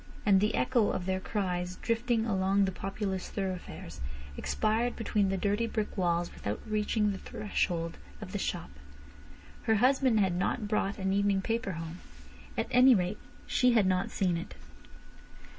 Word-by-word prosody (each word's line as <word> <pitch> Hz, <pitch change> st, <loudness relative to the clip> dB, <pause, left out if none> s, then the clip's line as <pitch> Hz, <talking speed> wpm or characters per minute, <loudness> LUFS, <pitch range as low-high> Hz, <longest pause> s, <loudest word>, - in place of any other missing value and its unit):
And 195 Hz, -2 st, +5 dB
the 210 Hz, -, +2 dB
echo 240 Hz, -5 st, +2 dB
of 175 Hz, -, -2 dB
their 190 Hz, 0 st, 0 dB
cries 180 Hz, -3 st, -2 dB
drifting 230 Hz, +2 st, 0 dB
along 195 Hz, -1 st, +2 dB
the 190 Hz, -, -1 dB
populous 195 Hz, 0 st, -3 dB
thoroughfares, 185 Hz, -, -5 dB, 0.3 s
expired 225 Hz, -, 0 dB
between 210 Hz, -3 st, +1 dB
the 195 Hz, -, 0 dB
dirty 205 Hz, +4 st, +1 dB
brick 215 Hz, -2 st, -2 dB
walls 175 Hz, -2 st, 0 dB
without 105 Hz, +1 st, -4 dB
reaching 210 Hz, 0 st, +1 dB
the 195 Hz, -, -5 dB
threshold 170 Hz, -5 st, -2 dB, 0.2 s
of -, -, -8 dB
the -, -, -2 dB
shop. -, -, -3 dB, 0.9 s
Her 220 Hz, -, +4 dB
husband 255 Hz, 0 st, +4 dB
had 190 Hz, -3 st, +2 dB
not 205 Hz, +4 st, -1 dB
brought 205 Hz, -1 st, 0 dB
an 190 Hz, 0 st, 0 dB
evening 200 Hz, -1 st, +2 dB
paper 225 Hz, -3 st, -1 dB
home. 165 Hz, +1 st, -6 dB, 0.6 s
At -, -, +1 dB
any 250 Hz, 0 st, +7 dB
rate 185 Hz, +2 st, -1 dB, 0.3 s
she 250 Hz, -1 st, +3 dB
had 220 Hz, -4 st, +4 dB
not 185 Hz, -1 st, +1 dB
seen 180 Hz, -3 st, 0 dB
it. 170 Hz, -, -7 dB
200 Hz, 160 wpm, -30 LUFS, 185-220 Hz, 0.9 s, any